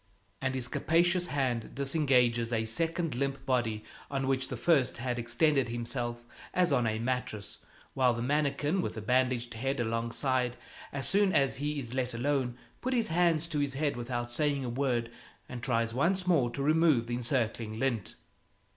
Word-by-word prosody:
And 130 0 -1
his 125 -2 -1
capacious 175 +6 +2
hand 130 -5 -1
disengages 130 -5 +2
a 110 -1 0
second 165 +8 -1
limp 135 +2 -2
body 120 -5 0 0.3
on 135 -1 -1
which 130 -1 0
the 125 - -5
first 140 -1 +2
had 125 0 -2
extended 125 +2 +2
himself 120 0 -3 0.3
as 180 -1 +3
on 120 -2 +2
a 110 0 0
mattress; 115 -4 -3 0.3
while 130 -2 +3
the 115 - -3
mannikin 145 +5 +1
with - - -3
the 110 - -5
bandaged 125 0 +1
head 135 +4 -2
alongside, 120 +2 0 0.3
as 140 -1 0
soon 200 -1 +4
as 135 -1 +2
he 145 +2 -2
is 120 -4 -4
let 125 -2 -1
alone, 125 -1 0 0.2
puts 260 +1 -1
his 230 -2 +2
hands 165 -1 +3
to 155 -3 -1
his 140 -2 -1
head 145 0 0
without 120 0 -3
saying 140 +1 0
a - - -2
word 120 -2 -1 0.4
and 125 -1 -7
tries 115 -2 0
once 180 +8 +2
more 155 -9 +3
to 135 +3 -3
remove 155 -5 +4
the 120 - -4
encircling 115 -3 -1
lint. 115 -9 -1
130 Hz, 175 wpm, -30 LUFS, 120-145 Hz, 0.4 s, soon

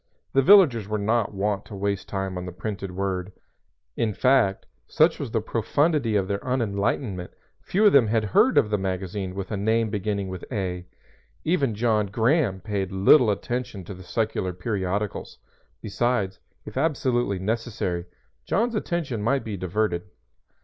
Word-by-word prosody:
The 135 - +5
villagers 135 - +6
were 105 0 -1
not 110 +1 +1
wont 100 0 -1
to 105 - -9
waste 100 0 -2
time 95 -1 -3
on 90 0 -5
the - - -5
printed 100 +1 -5
word; 95 0 -3 0.6
in 110 -3 -1
fact, 125 -7 +3 0.2
such 160 +2 +3
was 140 -5 -4
the 110 -1 0
profundity 120 +2 +1
of 95 -2 +1
their 100 0 -1
unenlightenment, 105 -5 -1 0.3
few 205 +4 +1
of 205 - +6
them 130 -5 +6
had 110 0 +1
heard 235 - +3
of 105 - +4
the 105 - +1
magazine 95 0 -3
with 95 +1 -5
a 105 - -1
name 110 +2 +1
beginning 100 -1 -2
with 95 -2 -7
"A." 90 -5 -3 0.6
Even 140 -9 +1
John 110 -2 +1
Graham 110 - +1
paid 100 -3 -3
little 105 +6 +5
attention 120 -1 -3
to 95 - -8
the 95 - -11
secular 95 -1 -2
periodicals; 100 +1 -3 0.5
besides, 105 -3 -1 0.3
if - - -8
absolutely 130 -8 +1
necessary, 100 -4 -2 0.4
John's 230 - 0
attention 170 - -2
might 135 +5 +1
be 110 -2 -4
diverted. 90 -1 -2
105 Hz, 155 wpm, -25 LUFS, 95-120 Hz, 0.6 s, villagers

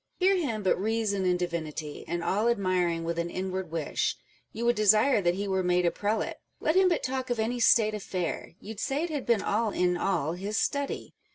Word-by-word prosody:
Hear 385 +1 +4
him 245 - -1
but 185 - +2
reason 215 -3 0
in 180 -1 +2
divinity, 160 -4 -4
And, 170 0 -2
all 210 +6 +1
admiring, 185 -6 +1
with 170 0 -2
an 170 0 -1
inward 185 0 -3
wish 160 - -1 0.3
You 230 +2 -4
would 240 0 +3
desire 215 +3 +4
that 175 -1 +2
he 200 +1 -3
were 190 -1 +1
made 180 0 +2
a 170 - +3
prelate. 210 +2 -2 0.2
Let 315 - +1
him 375 -1 +5
but 340 - 0
talk 260 0 -2
of 245 - 0
any 235 +3 -1
state 220 -2 +4
affair, 185 -5 -4
You'd 215 0 -8
say 280 +5 -1
it 345 - -3
had 290 -4 -4
been 230 -4 +3
all 220 +2 +1
in 180 -3 +1
all 170 -5 0
his 200 +5 -3
study. 280 -1 -2
200 Hz, 210 wpm, -28 LUFS, 180-235 Hz, 0.3 s, him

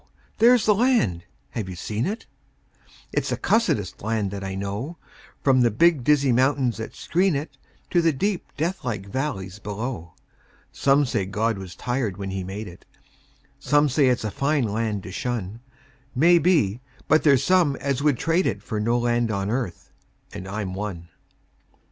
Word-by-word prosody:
There's 240 -1 +6
the 215 - +5
land. 205 - +2 0.3
(Have 105 -5 -4
you 90 - -6
seen 110 - -2
it?) 220 +3 -4 0.9
It's - - 0
the - - -1
cussedest 110 - 0
land 110 -2 -1
that 100 -1 -5
I 95 0 -4
know, 100 - -4 0.5
From 130 -2 +4
the 120 - +4
big, 155 +4 +3
dizzy 140 -1 +3
mountains 130 0 +2
that 110 - -6
screen 180 0 +1
it 140 0 -4 0.4
To 175 - +4
the 165 -1 +3
deep, 190 +7 -2
deathlike 130 - -2
valleys 100 -5 -4
below. 105 -5 -5 0.6
Some 140 +1 +3
say 110 -7 -1
God 105 +1 -1
was 95 -2 -8
tired 120 -6 -2
when 100 -1 -4
He 95 -1 -3
made 100 +3 -6
it; 90 -1 -12 0.8
Some 145 0 +3
say 140 +1 +3
it's 125 -3 +1
a 110 - -2
fine 140 +3 +1
land 110 -2 -2
to 95 - -8
shun; 115 -2 -3 0.6
Maybe; 160 - +4 0.3
but 155 +1 +4
there's 140 -3 +4
some 175 -6 +3
as 140 -1 -2
would 145 -4 +2
trade 165 +7 +1
it - - -2
For 110 -4 -3
no 115 +3 +1
land 120 -1 +1
on 100 -1 -1
earth 115 -9 -4 0.4
and 95 - -7
I'm 100 -1 -4
one. 95 -4 -5
120 Hz, 165 wpm, -24 LUFS, 100-145 Hz, 0.9 s, There's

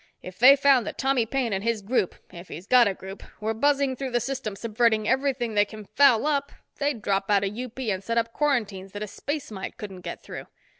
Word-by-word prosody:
If 185 0 -10
they 265 +4 +9
found 275 -5 +4
that - - -5
Tommy 265 -4 +1
Paine 245 -3 -1
and 195 0 -2
his 230 -2 -1
group, 210 -3 0 0.2
if 175 +1 -10
he's 170 +4 -9
got 245 +1 +5
a 200 - 0
group, 190 +1 -9 0.2
were 220 +1 -1
buzzing 275 +2 +1
through 265 +1 -4
the 240 -1 +1
system 240 -4 -4
subverting 220 0 +1
everything 260 -4 0
they 205 -1 +4
can 215 0 -10
foul 260 0 +4
up, 285 -2 0 0.3
they'd 280 -6 -1
drop 195 0 0
out 200 -1 +3
of 200 +1 -2
UP 250 0 -7
and 210 -7 -2
set 230 +3 -2
up 230 0 0
quarantines 210 -10 -1
that 205 +1 -5
a - - -5
space 285 +5 -5
mite 195 -2 -6
couldn't 195 -3 -8
get - - -7
through. - - -8
230 Hz, 230 wpm, -25 LUFS, 205-265 Hz, 0.3 s, they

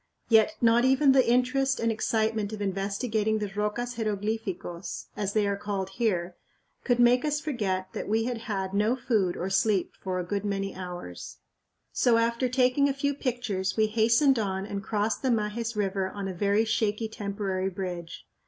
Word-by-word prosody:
Yet 220 -2 +5
not 235 0 +5
even 265 +2 +5
the 265 -2 +4
interest 255 +2 +2
and 230 0 +1
excitement 220 -1 0
of 215 - -5
investigating 205 +3 -1
the 210 -2 -3
"rocas 225 +4 -2
jeroglificos," 210 -4 -3
as 200 -1 -2
they 215 -1 +2
are 200 0 0
called 200 -1 -3
here, 185 -5 -1 0.5
could 245 -2 +2
make 245 +1 +5
us 295 -1 0
forget 195 -11 -2
that - - -4
we 220 +1 +2
had 240 0 -2
had 195 -5 -3
no 210 +4 +2
food 215 -8 0
or 185 +2 -3
sleep 195 -1 +1
for 185 -1 -2
a - - -2
good 200 +2 -2
many 195 -1 -2
hours. 175 - -7 0.6
So 235 -2 +3
after 235 +2 +1
taking 255 +2 +3
a 270 - -1
few 285 +1 0
pictures 235 -9 -2
we 220 - +4
hastened 230 +5 +3
on 190 -2 -2
and 200 -1 -4
crossed 210 +2 -1
the 265 - 0
Majes 230 0 -1
River 195 -2 -1
on 200 0 -5
a 190 - -4
very 200 +4 +2
shaky 220 0 0
temporary 200 -3 -3
bridge. 180 -3 -6
215 Hz, 175 wpm, -27 LUFS, 195-235 Hz, 0.6 s, Yet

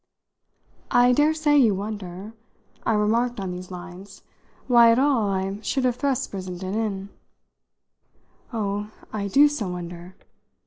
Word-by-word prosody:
"I 245 0 +5
daresay 300 +1 +3
you 230 -8 +4
wonder," 200 0 -6 0.5
I 225 - +3
remarked 225 +3 +1
on 190 -2 -3
these 180 0 -7
lines, 180 +2 -10 0.4
"why, 235 -2 +6
at 230 - +3
all, 260 -6 +2
I 195 +1 -2
should 255 +4 -1
have 250 -1 +1
thrust 275 -2 -1
Brissenden 185 -1 -5
in." 205 -3 -2 1.4
"Oh, 205 -2 -2 0.2
I 205 -2 -2
do 280 +9 +6
so 290 -9 -3
wonder!" 175 +1 -7
210 Hz, 130 wpm, -24 LUFS, 190-245 Hz, 1.4 s, why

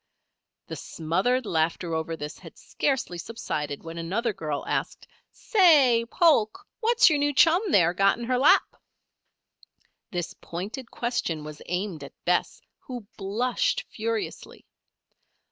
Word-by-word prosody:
The - - -7
smothered 195 +11 -1
laughter 165 -1 -1
over 160 0 -2
this 150 0 -7
had - - -13
scarcely 260 -11 -2
subsided 150 -8 -4
when 165 0 -7
another 210 +7 -1
girl 150 -5 -4
asked: - - -3 0.3
"Say, 295 - +4
Polk! 305 - +2
what's 475 +1 +4
your 305 -4 +3
new 290 0 +2
chum, 330 +5 +5
there, 175 -3 +4
got 195 +3 +3
in 240 - -6
her 250 +1 0
lap?" 275 - +4 1.3
This 175 -3 -4
pointed 210 +9 -6
question 175 -10 -2
was 150 0 -9
aimed 180 -3 -3
at 140 - -10
Bess, 180 0 0 0.2
who 245 -4 -8
blushed 245 - 0
furiously. 455 -3 -4
210 Hz, 130 wpm, -26 LUFS, 165-265 Hz, 1.3 s, chum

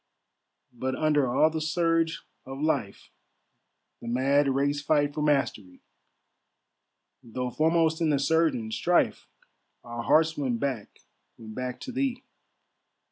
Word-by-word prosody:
"But 130 +2 -3
under 150 -2 +2
all 145 +6 +3
the 160 0 -3
surge 165 +1 0 0.2
of 135 +1 -8
life, 145 -10 -2 0.9
The 115 - -9
mad 135 +4 +2
race 140 +2 0
fight 145 -1 +1
for 150 - -3
mastery, 135 -11 -1 1.4
Though 125 +2 -5
foremost 160 +2 +1
in 160 - +2
the 145 - +2
surgent 140 -6 +1
strife, 175 +7 +1 0.6
Our 120 -1 -6
hearts 160 +6 +3
went 130 -5 -2
back, 130 -6 -4 0.4
went 110 -1 -10
back 125 +1 -5
to 260 - -6
thee." 260 0 -2
145 Hz, 125 wpm, -27 LUFS, 125-160 Hz, 1.4 s, all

